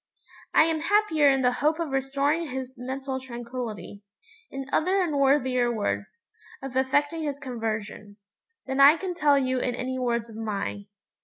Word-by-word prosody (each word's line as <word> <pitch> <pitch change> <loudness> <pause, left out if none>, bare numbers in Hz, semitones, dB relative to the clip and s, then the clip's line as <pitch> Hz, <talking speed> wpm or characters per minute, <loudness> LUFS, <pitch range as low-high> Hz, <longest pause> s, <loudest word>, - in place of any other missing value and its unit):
I - - +8
am 320 0 0
happier 330 -5 +3
in 270 -1 +2
the 250 - +4
hope 300 +5 +1
of 330 -3 -2
restoring 280 +4 0
his 260 0 -5
mental 265 +2 -4
tranquillity 235 -6 -7 0.5
in 270 0 -6
other 370 +5 +2
and 340 -6 0
worthier 260 -3 +2
words, 220 - -3 0.3
of 270 -1 -8
effecting 290 +5 +1
his 290 -3 -3
conversion 220 -5 -5 0.5
than 265 0 -3
I 285 +4 +8
can 370 +1 -4
tell 295 -4 +3
you 260 -1 0
in 245 -1 -1
any 260 +1 -3
words 235 -2 -1
of 225 - -12
mine. 205 -2 -4
265 Hz, 160 wpm, -26 LUFS, 240-295 Hz, 0.5 s, I